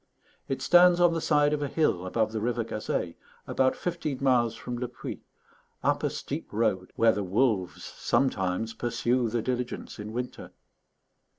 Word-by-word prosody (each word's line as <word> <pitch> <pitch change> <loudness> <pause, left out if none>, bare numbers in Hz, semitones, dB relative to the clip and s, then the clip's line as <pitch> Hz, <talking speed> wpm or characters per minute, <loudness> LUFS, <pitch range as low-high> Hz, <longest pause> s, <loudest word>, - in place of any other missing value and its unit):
It 135 0 -3
stands 175 +3 +6
on 175 -1 +5
the 165 - -1
side 150 -1 +3
of 150 - -1
a 145 - 0
hill 110 - 0
above 110 +3 0
the 110 -1 -3
river 120 +1 0
Gazeille, 105 -6 -3 0.3
about 130 0 +1
fifteen 165 -6 -3
miles 125 -4 +2
from 120 -1 -5
Le 125 - -2
Puy, - - -7 0.6
up - - +2
a - - +1
steep - - -5
road 105 -4 0
where 115 0 +5
the 105 - -2
wolves 95 -1 0
sometimes 110 -4 0
pursue 120 0 0
the 115 0 -1
diligence 125 -3 -3
in 105 +1 -6
winter. 125 +2 -6
120 Hz, 165 wpm, -28 LUFS, 110-135 Hz, 0.6 s, stands